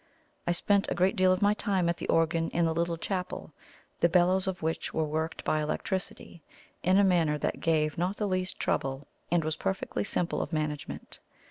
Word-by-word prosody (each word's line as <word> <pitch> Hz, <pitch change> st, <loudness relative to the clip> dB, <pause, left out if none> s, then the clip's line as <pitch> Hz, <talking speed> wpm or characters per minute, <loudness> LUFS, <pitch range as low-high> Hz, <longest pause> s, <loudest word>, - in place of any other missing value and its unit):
I -, -, +3 dB
spent 200 Hz, +3 st, +2 dB
a -, -, -1 dB
great 185 Hz, +2 st, +2 dB
deal 185 Hz, 0 st, +4 dB
of 185 Hz, +2 st, +1 dB
my 205 Hz, +1 st, +5 dB
time 195 Hz, -4 st, 0 dB
at 170 Hz, 0 st, 0 dB
the -, -, -5 dB
organ 165 Hz, 0 st, +2 dB
in 170 Hz, 0 st, +1 dB
the 165 Hz, -, +1 dB
little 170 Hz, +1 st, 0 dB
chapel, 180 Hz, -3 st, -4 dB, 0.5 s
the 170 Hz, -, +4 dB
bellows 185 Hz, +2 st, +3 dB
of 185 Hz, -3 st, -3 dB
which 160 Hz, +1 st, -2 dB
were 160 Hz, -, +2 dB
worked 160 Hz, +2 st, -3 dB
by 155 Hz, -, +1 dB
electricity, 170 Hz, +2 st, -4 dB, 0.4 s
in 185 Hz, +2 st, +3 dB
a 200 Hz, -, +6 dB
manner 170 Hz, -5 st, +3 dB
that -, -, -2 dB
gave 155 Hz, -2 st, +1 dB
not 185 Hz, +4 st, 0 dB
the 210 Hz, -, 0 dB
least 185 Hz, -1 st, -2 dB
trouble, 135 Hz, +1 st, -1 dB, 0.2 s
and 175 Hz, -1 st, +2 dB
was 155 Hz, 0 st, -1 dB
perfectly 195 Hz, -, -2 dB
simple 180 Hz, -3 st, -1 dB
of -, -, -4 dB
management. 150 Hz, -2 st, -3 dB
170 Hz, 200 wpm, -29 LUFS, 160-185 Hz, 0.5 s, a